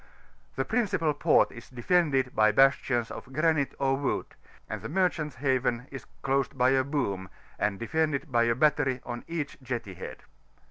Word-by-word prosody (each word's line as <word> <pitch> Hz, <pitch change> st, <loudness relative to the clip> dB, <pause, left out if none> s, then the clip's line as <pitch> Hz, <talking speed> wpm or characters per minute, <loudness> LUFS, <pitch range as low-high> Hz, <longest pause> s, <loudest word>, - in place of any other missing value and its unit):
The 135 Hz, -, -1 dB
principal 185 Hz, -10 st, +1 dB
port 145 Hz, -, +3 dB
is 115 Hz, -, -12 dB
defended 135 Hz, 0 st, +1 dB
bv 110 Hz, 0 st, +4 dB
bastions 135 Hz, -3 st, +3 dB
of 130 Hz, -, -9 dB
granite 155 Hz, 0 st, +1 dB
or 135 Hz, -1 st, +1 dB
wood, 140 Hz, -1 st, -1 dB, 0.4 s
and -, -, -5 dB
the -, -, -6 dB
merdianta* 165 Hz, -5 st, 0 dB
haven 130 Hz, -2 st, 0 dB
is 135 Hz, -, -8 dB, 0.2 s
closed 135 Hz, 0 st, 0 dB
by 125 Hz, +1 st, +4 dB
a 135 Hz, -1 st, +3 dB
boom, 100 Hz, -10 st, -2 dB, 0.3 s
and 100 Hz, -2 st, 0 dB
demnded 155 Hz, +4 st, -1 dB
by 120 Hz, -1 st, +3 dB
a 115 Hz, 0 st, +2 dB
battery 135 Hz, -2 st, +2 dB
on 120 Hz, 0 st, -5 dB
each 155 Hz, -5 st, -4 dB
jetty 120 Hz, -6 st, -4 dB
head. -, -, -9 dB
135 Hz, 165 wpm, -28 LUFS, 120-150 Hz, 0.4 s, bv